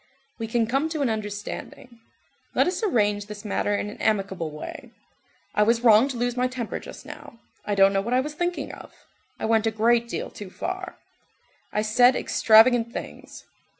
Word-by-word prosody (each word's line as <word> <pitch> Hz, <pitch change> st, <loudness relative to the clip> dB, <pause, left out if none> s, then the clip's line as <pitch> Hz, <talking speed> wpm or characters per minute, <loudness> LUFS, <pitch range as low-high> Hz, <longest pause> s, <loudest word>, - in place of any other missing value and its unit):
"We 225 Hz, -, -3 dB
can 230 Hz, 0 st, +1 dB
come 270 Hz, +7 st, 0 dB
to 315 Hz, -2 st, -3 dB
an 245 Hz, -, +1 dB
understanding. 215 Hz, +3 st, -6 dB, 0.6 s
Let -, -, +4 dB
us 360 Hz, +4 st, -2 dB
arrange 210 Hz, -, +1 dB
this 210 Hz, 0 st, -9 dB
matter 205 Hz, 0 st, 0 dB
in 205 Hz, -, -2 dB
an 210 Hz, -, -9 dB
amicable 195 Hz, -6 st, 0 dB
way. 150 Hz, 0 st, -9 dB, 0.6 s
I -, -, +2 dB
was 230 Hz, +2 st, +3 dB
wrong 230 Hz, +1 st, +6 dB
to 265 Hz, -3 st, -5 dB
lose 245 Hz, 0 st, -1 dB
my 250 Hz, 0 st, +1 dB
temper 250 Hz, -3 st, -5 dB
just -, -, -11 dB
now, 230 Hz, -, -11 dB, 0.3 s
I 205 Hz, -, -1 dB
don't 195 Hz, 0 st, +5 dB
know 195 Hz, -, +2 dB
what 235 Hz, +5 st, -1 dB
I -, -, +4 dB
was 295 Hz, +3 st, -3 dB
thinking 350 Hz, +3 st, -3 dB
of, -, -, -12 dB, 0.5 s
I -, -, -2 dB
went 225 Hz, 0 st, +2 dB
a -, -, +4 dB
great 230 Hz, +2 st, +2 dB
deal -, -, -4 dB
too 205 Hz, -2 st, -9 dB
far, 370 Hz, -, -5 dB, 0.7 s
I 210 Hz, -, 0 dB
said 245 Hz, +4 st, +4 dB
extravagant 230 Hz, +1 st, +4 dB
things. -, -, -8 dB
225 Hz, 185 wpm, -25 LUFS, 210-250 Hz, 0.7 s, wrong